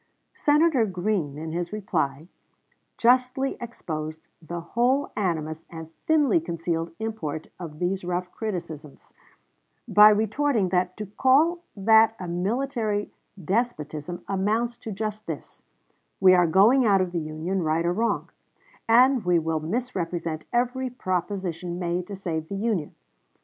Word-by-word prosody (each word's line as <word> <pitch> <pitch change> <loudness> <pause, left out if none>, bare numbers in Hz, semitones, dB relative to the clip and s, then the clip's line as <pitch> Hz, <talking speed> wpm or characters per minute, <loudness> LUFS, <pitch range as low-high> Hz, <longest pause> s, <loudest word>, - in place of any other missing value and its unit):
Senator 295 -3 +3
Green, 180 -6 -2
in 160 +1 -5
his 175 +1 -3
reply, 160 -8 -2 0.7
justly 255 +2 +2
exposed 155 -9 -6
the 170 +2 -6
whole 245 +10 0
animus 160 -5 -2
and 160 -1 -9 0.2
thinly 295 - +4
concealed 165 0 -3
import 215 -9 -4
of 160 -4 -8
these 180 +3 -1
rough 180 0 -3
criticisms, 170 -9 -6 0.7
by 210 0 +8
retorting 220 0 +1
that, 180 0 0
to 215 - -4
call 270 - +3 0.2
that 220 +2 +5
a 180 - -5
military 210 +3 -1 0.3
despotism 175 -6 -2
amounts 215 +5 0
to 225 - -8
just 215 +1 -4
this: - - -7 0.6
we 185 -1 +7
are 175 -1 +5
going 210 +10 +5
out 200 -4 +4
of 185 -1 -1
the 175 - -1
Union, 160 +5 -3
right 160 +1 0
or 175 - +2
wrong, 230 +4 -1 0.6
and 250 +1 +5
we 175 -1 +3
will 160 -1 0
misrepresent 170 -5 -3
every 250 +2 0
proposition 180 -5 -3
made 175 0 -2
to 200 - -6
save 160 -5 -4
the 200 - -4
Union. 200 -7 -2
190 Hz, 135 wpm, -25 LUFS, 165-225 Hz, 0.7 s, by